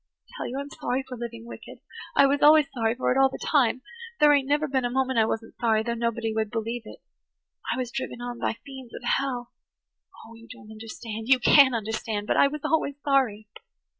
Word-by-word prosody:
I - - -22
tell - - -4
you 255 - -5
I'm 280 +1 -5
sorry 255 +2 -2
for 250 - -7
living 235 -1 -7
wicked–I 235 - -2
was 280 +1 +1
always 305 0 +7
sorry 225 -2 0
for 255 - 0
it 260 - +2
all 270 0 +5
the - - -7
time. 255 -3 +1 0.4
There 295 -1 +6
ain't 275 -2 +2
never 295 +2 +1
been 265 -2 0
a 245 - 0
moment 260 -1 0
I 220 - +4
wasn't 225 0 -4
sorry, 220 -2 +2
though 235 +1 -2
nobody 230 -1 -2
would 220 -1 -1
believe 230 +2 -3
it. - - -12 0.7
I - - -1
was 250 -2 -3
driven 260 -2 -5
on 245 0 -6
by - - -1
fiends 265 -3 -10
of - - -9
hell. 245 -1 -1 0.7
Oh, 225 - -13
you 230 0 -15
don't 215 -3 -13
understand–you 225 +2 -1
can't 260 0 +6
understand–but 220 -1 -2
I - - +5
was 300 +1 -6
always 315 -3 0
sorry!" 250 -7 +1
245 Hz, 205 wpm, -26 LUFS, 225-270 Hz, 0.7 s, always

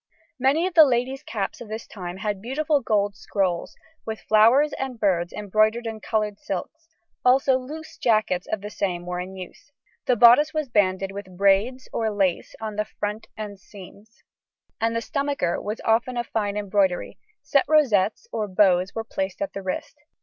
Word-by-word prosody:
Many 275 +7 +3
of 370 - -2
the 325 -2 +9
ladies' 260 0 0
caps 210 -9 -4
of 235 - -8
this 220 +2 -6
time 180 -3 -7
had 205 -1 -3
beautiful 290 +5 0
gold 205 -3 0
scrolls, 185 -4 -2 0.3
with 220 -1 -5
flowers 235 +8 +4
and 260 -3 -4
birds 175 -4 +1
embroidered 215 +3 +1
in 225 -1 -4
coloured 210 -2 -2
silks, 320 - -6 0.4
also 265 +1 +4
loose 310 +5 -9
jackets 215 -6 +1
of 215 - -1
the 210 +1 -7
same 180 -4 -2
were 180 0 -3
in 185 +1 -6
use. 185 +9 -11 0.4
The 250 - +4
bodice 245 +7 +6
was 305 -4 -1
banded 195 -3 +1
with 195 -2 -9
braids 200 +7 +2
or 225 -1 0
lace 195 -4 -1
on 215 -2 -5
the 210 - 0
front 210 +1 -5
and 205 -2 -6
seams, 205 +2 -15 0.6
and 230 0 0
the 230 - 0
stomacher 280 - -1
was 210 +2 -4
often 235 +2 +1
of 240 - -1
fine 205 -3 -2
embroidery; 195 -3 0 0.2
set 285 -2 +2
rosettes 245 - +2
or 215 -1 -2
bows 185 -1 +3
were 225 - -2
placed 190 -4 -4
at 200 - -3
the 195 - -5
waist. 190 +9 -5
215 Hz, 175 wpm, -24 LUFS, 195-250 Hz, 0.6 s, the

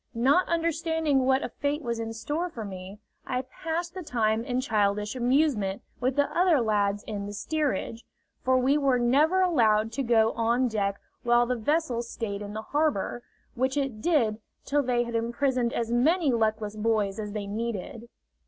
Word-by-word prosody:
Not 275 +10 +3
understanding 320 -4 +1
what 265 +1 +3
a - - -3
fate 290 +2 -2
was 235 -2 -2
in 225 0 -3
store 295 +10 -3
for 230 -9 -7
me, 190 0 -8 0.3
I 255 0 -1
passed 330 +6 -4
the 375 - -6
time 225 -7 0
in 250 0 -1
childish 210 -3 0
amusement 245 -6 +1 0.2
with 255 +1 0
the 285 0 +3
other 350 -4 +4
lads 205 -3 +1
in 205 -2 -5
the 205 - -6
steerage, 240 -3 -2 0.4
for 260 0 +3
we 270 +4 +3
were 270 -3 +3
never 290 +10 +3
allowed 225 -11 +3
to 275 - -2
go 230 -3 +3
on 235 +3 +1
deck 200 -3 -1 0.2
while 240 0 +3
the 250 +1 -1
vessel 255 +1 0
stayed 220 -4 -5
in 205 0 -6
the 220 +1 -5
harbor, 290 -5 0 0.3
which 260 +2 -1
it 270 -6 -2
did 235 -10 +2 0.3
till 290 +1 +2
they 245 -2 +1
had 235 0 -6
imprisoned 240 +1 0
as 230 -1 -2
many 300 +5 +3
luckless 215 -2 0
boys 215 -2 0
as 210 -1 -5
they 210 -2 -3
needed. 230 +2 -5
240 Hz, 175 wpm, -27 LUFS, 215-285 Hz, 0.4 s, other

